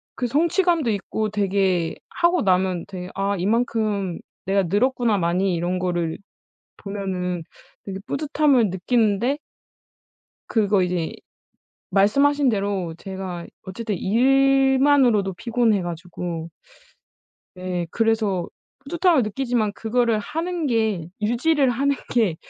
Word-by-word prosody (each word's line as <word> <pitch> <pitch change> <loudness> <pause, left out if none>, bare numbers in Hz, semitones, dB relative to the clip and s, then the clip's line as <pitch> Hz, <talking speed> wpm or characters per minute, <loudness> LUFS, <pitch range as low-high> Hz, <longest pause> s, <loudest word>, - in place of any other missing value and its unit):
그 250 - -1
성취감도 335 +1 +2
있고 215 +1 -2
되게 195 -4 0
하고 345 -1 +2
나면 185 -2 +1
되게 180 -2 -7
'아 200 +1 0
이만큼 210 -2 0 0.3
내가 195 +1 +2
늘었구나 225 +4 +1
많이.' 180 +1 +1
이런 175 +2 -1
거를 175 -3 -1 0.6
보면은 185 -3 -4 0.4
되게 195 -1 -5
뿌듯함을 280 - +2
느끼는데 225 +6 +1 1.1
그리고 205 -3 +2
이제 180 -2 -1 0.8
말씀하신 275 +9 +3
대로 195 -6 -1
제가 190 -3 -6 0.2
어쨌든 205 +3 -4
일만으로도 265 -2 +3
피곤해 225 -3 +1
가지고 170 -1 -5 1.1
네 180 -2 -3
그래서 220 -6 +1 0.3
뿌듯함을 335 - +2
느끼지만 220 -1 -1
그거를 225 +1 +1
하는 330 - -3
게 215 -8 0
유지를 265 +5 +2
하는 280 +3 +1 0.2
게 215 -9 +2
210 Hz, 255 characters per minute, -23 LUFS, 185-255 Hz, 1.1 s, 말씀하신